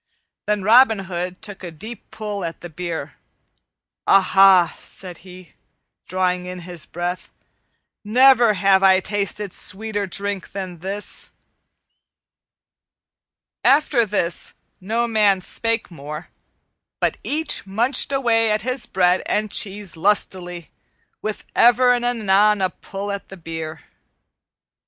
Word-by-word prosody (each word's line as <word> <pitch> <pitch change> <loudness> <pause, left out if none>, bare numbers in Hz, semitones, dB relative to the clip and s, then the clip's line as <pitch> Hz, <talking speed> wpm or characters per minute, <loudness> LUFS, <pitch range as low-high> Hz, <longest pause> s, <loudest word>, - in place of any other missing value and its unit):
Then 210 -2 0
Robin 225 +2 +6
Hood 180 0 -5
took 205 -3 -8
a 175 - -5
deep 210 +8 -10
pull 210 -3 -5
at 165 -1 -5
the 175 - -9
beer. 160 -4 -5 0.9
"Aha!" 190 -2 +6
said 180 -3 -8
he, 180 -2 -14 0.5
drawing 180 0 -1
in 180 0 -7
his 175 -1 -6
breath, 175 +1 -4 0.7
"never 240 0 +5
have 190 0 +4
I 190 -1 +6
tasted 205 0 -3
sweeter 205 0 -2
drink 200 +1 -4
than 185 -3 -6
this." 195 +4 -4 2.3
After 275 -3 +4
this 190 -5 -2 0.2
no 225 +5 -1
man 210 -4 +3
spake 230 +3 -2
more, 150 +1 -8 0.7
but - - 0
each 300 -7 -1
munched 235 +9 +1
away 230 -4 +2
at 210 -1 0
his 255 0 -2
bread 180 -1 +2
and 215 0 -1
cheese 200 -2 -4
lustily, 180 -2 -1 0.5
with 215 -1 -4
ever 245 +1 +5
and 245 -1 -1
anon 210 -3 +3
a 185 - +1
pull 200 +1 -6
at 200 0 -6
the 195 - -10
beer. 160 -2 -6
195 Hz, 120 wpm, -21 LUFS, 180-215 Hz, 2.3 s, Robin